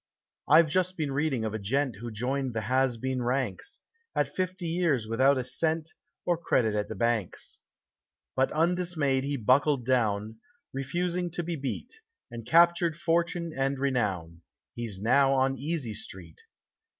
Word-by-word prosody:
I've 155 +2 +7
just 185 +4 0
been 150 -4 -1
reading 135 -4 0
of 110 - -3
a 110 - -3
gent 125 +3 -1
who 120 +3 -6
joined 125 +3 -2
the 110 - 0
has 130 +3 +1
been 130 +2 -2
ranks, 125 -5 -2 0.3
at - - 0
fifty 185 0 -2
years 165 -9 +1
without 130 +5 +3
a 130 - -1
cent, 160 +4 -1 0.3
or 175 -2 +1
credit 115 -9 +1
at 105 -1 -1
the 110 - -5
banks. 115 -3 -2 0.8
But 130 0 +2
undismayed 160 -5 +1
he 140 +1 -2
buckled 130 +2 +3
down, 110 -4 0 0.3
refusing 175 +6 -1
to 175 +1 -4
be 170 0 -3
beat, 160 - -5 0.3
and 115 -1 -8
captured 170 -1 +4
fortune 170 0 0
and 135 +1 0
renown; 100 -12 -1 0.3
he's 115 -5 -5
now 135 +6 +4
on 135 0 +1
Easy 145 -5 -3
Street. 90 -5 -10
135 Hz, 150 wpm, -28 LUFS, 115-165 Hz, 0.8 s, I've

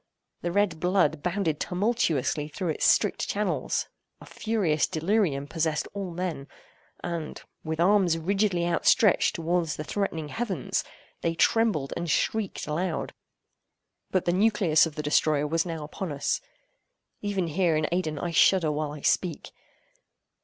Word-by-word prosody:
The 175 - -2
red 190 -4 +1
blood 175 -4 +2
bounded 175 -4 -1
tumultuously 175 - 0
through 175 +3 -4
its 155 - +1
strict - - +2
channels. - - -1 0.3
A - - -13
furious 195 -9 0
delirium 165 -4 0
possessed 160 0 -1
all 200 -2 -4
men; 170 -5 -4 0.6
and, 170 -3 -4 0.2
with 160 0 -4
arms 180 -2 +4
rigidly 190 +1 +1
outstretched 210 +4 +3
towards 165 -1 0
the 150 - -5
threatening 160 -4 -3
heavens, 200 - -2 0.4
they 165 0 0
trembled 190 -8 +2
and 170 - -3
shrieked 215 +6 0
aloud. 170 +5 -2 1.0
But 185 - 0
the 175 - +2
nucleus 190 -6 +4
of 155 - -10
the 150 - -4
destroyer 150 0 +2
was 165 +3 0
now 165 -2 -4
upon 155 +3 -5
us; 145 - -1 0.8
even 200 -3 -1
here 170 0 +1
in 155 - +1
Aidenn, 170 -4 -1
I 175 +4 -3
shudder 165 -1 +4
while 150 0 -2
I 150 - -9
speak. 175 +3 0
170 Hz, 140 wpm, -27 LUFS, 155-190 Hz, 1.0 s, arms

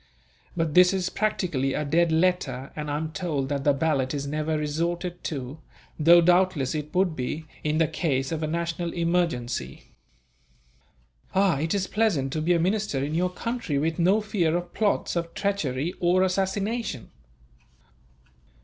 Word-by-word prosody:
But 165 -3 0
this 180 +2 +6
is 185 -1 -1
practically 175 -11 -1
a 150 - -1
dead 165 +3 +2
letter, 160 -5 0
and 150 -1 -4
I 145 - -1
am 160 +1 -4
told 155 -7 -2
that 140 -1 -2
the 145 - +4
ballot 140 -2 0
is 140 -1 -3
never 155 +2 -1
resorted 170 +4 -2
to; 140 0 -5 0.4
though 170 +3 +7
doubtless 175 -5 +3
it 150 0 -5
would 180 -3 +2
be, 150 +5 -4 0.2
in 150 0 0
the 165 -1 +3
case 140 -4 -1
of 160 -1 -2
a 155 - -1
national 170 +1 -2
emergency." 165 - -1 1.4
"Ah! 190 -6 +3
It 160 +5 0
is 195 -2 0
pleasant 185 -12 0
to 155 - -1
be 170 +3 +2
a 170 - +2
minister 185 -6 0
in 145 +2 -3
your 180 +3 +1
country, 205 - -3
with 160 +3 -1
no 190 +5 +4
fear 175 -6 0
of 175 0 -7
plots, 210 -4 0
of 170 -1 -3
treachery, 175 -6 -1
or 180 +1 +3
assassination. 195 - -2
165 Hz, 160 wpm, -26 LUFS, 150-180 Hz, 1.4 s, though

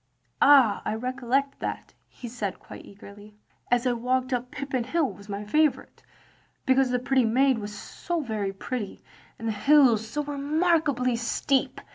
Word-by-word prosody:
"Ah, 270 -7 +6
I 215 - -2
recollect 255 +3 -2
that," - - -5
he 245 - -10
said 220 -5 -4
quite - - -12
eagerly. 205 +1 -14 0.3
*As 245 +1 +2
I 250 - +2
walked 255 +2 -1
up 250 0 -2
Pippin 270 -2 -3
Hill, 290 +3 0
' - - -12
was 200 +1 -15
my 200 +1 -5
favourite, 305 +6 0 0.6
because 260 0 +3
the 250 - +1
pretty 260 +1 +1
maid 255 +2 +2
was 210 0 -7
so 345 - -4
very 215 -8 -3
pretty, 205 +2 -6 0.3
and 225 - -6
the - - +1
hill 255 +1 +4
so 225 +7 -4
remarkably 290 -3 0
steep. 260 +3 -1
250 Hz, 160 wpm, -26 LUFS, 220-275 Hz, 0.6 s, Ah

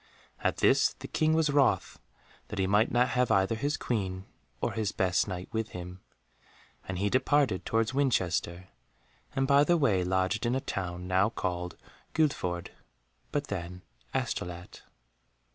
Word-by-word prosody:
At - - 0
this - - +4
the - - -9
King 155 0 +1
was 160 -2 +2
wroth, 135 -10 +2 0.5
that 105 - -7
he 95 - +2
might 105 +4 +3
not 120 +1 +3
have 125 +1 +1
either 95 +2 +3
his 145 +6 -1
Queen 95 -5 -2 0.3
or - - -1
his 110 -3 -1
best 90 +1 +1
Knight 90 -2 -5
with 110 -1 -3
him, 90 +1 -7 0.9
and 95 - -3
he 100 +3 +1
departed 130 -3 +2
towards 115 +2 +1
Winchester 95 -9 0 0.7
and 135 - +2
by 140 +1 +5
the 175 +3 +3
way 110 - +2
lodged 95 +5 0
in 120 - +1
a - - +1
town 90 -6 -4
now 95 +3 +3
called 90 -5 -3 0.4
Guildford, 90 - 0 0.6
but 145 0 -1
then 90 -4 -6 0.3
Astolat. 90 0 -4
100 Hz, 150 wpm, -29 LUFS, 90-130 Hz, 0.9 s, by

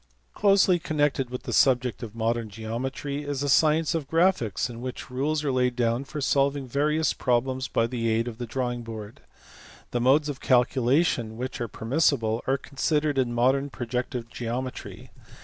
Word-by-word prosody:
Closely 195 -3 +4
connected 145 -6 0
with 125 0 -6
the - - -4
subject 125 -2 +3
of 115 -2 -7
modern 115 0 -1
geometry 125 +7 -4
is 145 -2 -3
the 145 - -1
science 155 +3 +3
of 155 -4 -3
graphics 165 - +2
in 120 -1 -9
which 125 0 -6
rules 145 +4 -1
are 140 - 0
laid 125 -1 +1
down 120 +2 0
for 150 +2 -6
solving 140 0 +1
various 150 +5 +1
problems 130 +1 0
by 115 - +1
the 115 -1 -2
aid 115 +2 +1
of 115 -1 -7
the 120 - -4
drawing 120 0 -2
board: 110 -6 -8 0.7
the 120 - -1
modes 140 +5 +4
of 145 -3 -4
calculation 125 -1 +2
which 125 0 -5
are 120 - -1
permissible 115 -1 0
are 135 +1 +2
considered 145 +1 0
in 125 -2 +1
modern 130 +4 +2
protective 125 -1 -4
geometry. 120 +2 -6
130 Hz, 165 wpm, -26 LUFS, 120-145 Hz, 0.7 s, Closely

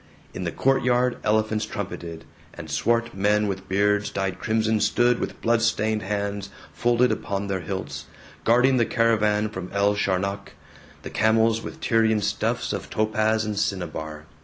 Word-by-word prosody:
In 90 - -5
the 85 - -1
courtyard, 125 0 +2
elephants 110 0 +1
trumpeted, 85 -5 -6 0.3
and 80 - -8
swart 115 +9 +1
men 105 +2 +2
with 95 -1 -5
beards 105 +1 +2
dyed 95 -1 -3
crimson 110 0 +1
stood 120 +2 +2
with - - -4
blood 115 0 +2
stained 110 -1 +1
hands 100 0 -3 0.2
folded 120 +8 +2
upon 100 0 -2
their 95 -1 -2
hilts, 95 +2 -5 0.4
guarding 125 +3 +4
the 120 - +3
caravan 110 -2 +2
from 95 -3 -7
El 100 +1 +2
Sharnak, 100 0 -2 0.5
the - - -7
camels 110 0 +3
with - - -9
Tyrian 110 -2 +2
stuffs - - -1
of - - -5
topaz 110 0 +1
and 105 -1 -2
cinnabar. 80 -6 -3
105 Hz, 150 wpm, -24 LUFS, 95-115 Hz, 0.5 s, guarding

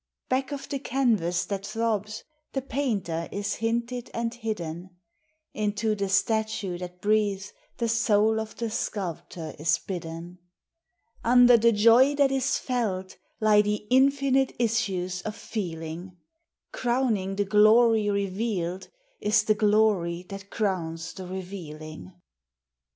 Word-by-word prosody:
Back 260 +2 0
of 280 -1 -5
the 280 - -3
canvas 225 -11 +1
that 200 -1 -4
throbs 215 -1 -2 0.3
the 270 - -1
painter 200 - -2
is 200 0 -3
hinted 235 +2 -2
and 230 0 -2
hidden; 180 -6 -5 0.6
Into 215 +1 0
the 200 -2 -2
statue 215 -2 0
that 180 0 -8
breathes 205 -2 +1 0.2
the 235 - 0
soul 220 -1 +3
of 220 0 -6
the 230 -2 -3
sculp 200 -7 -3
tor 160 -3 -7
is 160 +2 +2
bidden; 175 -1 -7 0.8
Under 245 +1 +7
the 230 0 +5
joy 230 +6 +5
that 280 -1 +3
is 270 0 +1
felt 200 -7 -2 0.2
lie 215 -1 +5
the 210 0 -2
infinite 270 0 +3
issues 195 -6 -1
of 215 +3 -5
feeling; 175 -3 -6 0.5
Crowning 235 -6 0
the 205 0 0
glory 215 +1 +5
revealed 195 -2 -2 0.3
is 210 0 +3
the 215 - +3
glory 205 -5 +2
that 195 0 -8
crowns 170 -6 -2
the 185 -2 -8
revealing. 155 - -8
210 Hz, 125 wpm, -26 LUFS, 185-230 Hz, 0.8 s, Under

